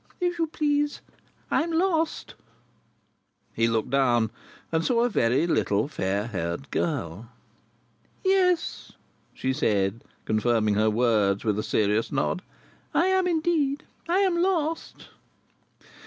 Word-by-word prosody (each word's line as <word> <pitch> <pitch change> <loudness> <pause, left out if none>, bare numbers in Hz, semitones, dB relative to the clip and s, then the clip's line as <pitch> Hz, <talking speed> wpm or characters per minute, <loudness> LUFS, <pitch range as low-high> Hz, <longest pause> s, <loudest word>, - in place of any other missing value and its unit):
If 355 -1 -1
you 330 - +1
please, 295 -1 0 0.5
I - - +3
am 335 +2 -2
lost." 330 -1 0 1.2
He 115 - +2
looked 115 +1 -1
down, 120 -5 +2 0.4
and 160 0 +1
saw 235 +2 +2
a 245 - +2
very 130 - +2
little 105 -9 +1
fair 100 -7 -2
haired 95 +2 -4
girl. 115 - -2 1.0
"Yes," 365 -3 +1 0.4
she 130 0 -1
said, 105 -5 0 0.2
confirming 110 -1 +1
her 110 +1 +3
words 105 -3 +2
with 105 -1 +1
a - - -2
serious 105 +1 +1
nod. 140 +6 0 0.5
"I 345 - +4
am 375 -1 +2
indeed. 315 -4 +1 0.3
I 370 +3 +3
am 360 -3 +2
lost." 330 -4 -1
140 Hz, 125 wpm, -26 LUFS, -, 1.2 s, I